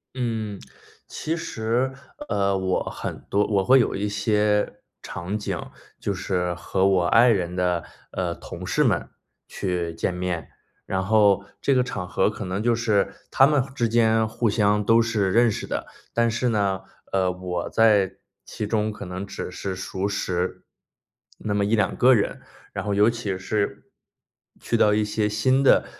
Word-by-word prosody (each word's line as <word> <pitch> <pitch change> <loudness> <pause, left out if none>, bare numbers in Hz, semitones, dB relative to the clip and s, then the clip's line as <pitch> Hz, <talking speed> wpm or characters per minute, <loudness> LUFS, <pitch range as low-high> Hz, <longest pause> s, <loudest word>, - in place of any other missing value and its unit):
嗯， 110 -5 -3 0.5
其 165 +2 -3
实， 120 0 -1 0.3
呃， 100 - +1
我 95 -1 0
很 - - -6
多 100 +1 +2
我 100 -2 +2
会 130 +5 +6
有 120 - +1
一 105 +1 -1
些 105 0 +1 0.2
场 90 +5 -4
景， 105 - -3 0.4
就 100 - -1
是 90 -2 -1
和 95 +1 0
我 95 -2 +3
爱 115 +7 +6
人 90 -5 0
的 90 -1 0 0.3
呃， 85 -2 -2
同 - - -8
事 - - +2
们 - - +1 0.4
去 90 -3 -2
见 90 - -1
面。 90 -4 -3 0.4
然 95 0 -1
后 100 0 +3 0.2
这 140 - +2
个 130 - +4
场 95 -7 -4
合 95 - +2
可 105 0 -6
能 95 +2 -3
就 120 +1 +2
是， 110 -3 +1 0.2
他 135 - +6
们 145 -3 +2
之 120 -3 +1
间 110 -1 +3
互 110 +1 0
相 105 0 +2
都 115 +2 +5
是 110 -4 0
认 120 +3 +5
识 105 - -3
的， - - -4 0.3
但 115 0 +2
是 120 +2 0
呢， 100 -4 0 0.3
呃， 95 -1 +2
我 90 -1 -4
在 105 -4 +3 0.3
其 105 - -5
中 110 0 0
可 105 -1 -8
能 90 +2 -5
只 100 - -6
是 95 +1 -4
熟 95 +1 -3
识 90 -2 -2 0.7
那 105 - -3
么 100 0 +1
1-2 105 -1 +1
个 130 +1 +6
人， 105 -5 0 0.3
然 - - -3
后 105 - 0
尤 105 +3 +5
其 110 -5 -3
是 100 +2 -2 0.7
去 - - -2
到 105 - +4
一 105 0 +2
些 105 0 0
新 130 +6 +2
的 135 - +5
105 Hz, 180 characters per minute, -24 LUFS, 95-115 Hz, 0.7 s, 会